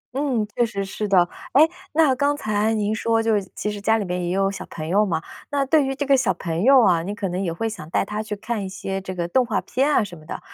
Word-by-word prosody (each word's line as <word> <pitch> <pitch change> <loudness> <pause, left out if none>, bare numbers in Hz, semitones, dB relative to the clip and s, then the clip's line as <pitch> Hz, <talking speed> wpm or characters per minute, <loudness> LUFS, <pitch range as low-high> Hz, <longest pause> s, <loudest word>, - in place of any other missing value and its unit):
嗯， 265 -6 0
确 240 - +3
实 200 -4 -2
是 210 +2 -4
的。 185 -3 +4 0.3
哎， 305 +4 +7 0.3
那 310 -4 +4
刚 285 +2 +1
才 215 -3 0
您 210 0 0
说 225 +1 +1
就 225 - +2
是 200 -3 -1
其 210 - -2
实 205 -1 -6
家 220 +2 +3
里 205 - -2
面 180 0 -2
也 175 - -2
有 195 +1 +1
小 195 - -6
朋 155 -1 -6
友 200 +5 +3
嘛。 165 -5 -1 0.3
那 280 -1 0
对 300 +2 +4
于 270 - -2
这 285 +1 -2
个 275 - +5
小 265 - +2
朋 165 -1 -3
友 265 +1 +6
啊， 175 -5 +4
你 200 +5 -4
可 195 -3 -3
能 185 +2 -2
也 170 - -1
会 225 +7 -2
想 215 -8 -7
带 185 - +1
他 210 +1 -3
去 215 -1 -5
看 215 +1 -4
一 190 - -5
些 195 0 -4
这 185 -1 -6
个 170 -1 -2
动 255 +8 +3
画 230 -3 -1
片 275 +4 0
啊 235 - +3
什 180 -4 -8
么 155 - -15
的， - - -5
210 Hz, 305 characters per minute, -23 LUFS, 190-245 Hz, 0.3 s, 哎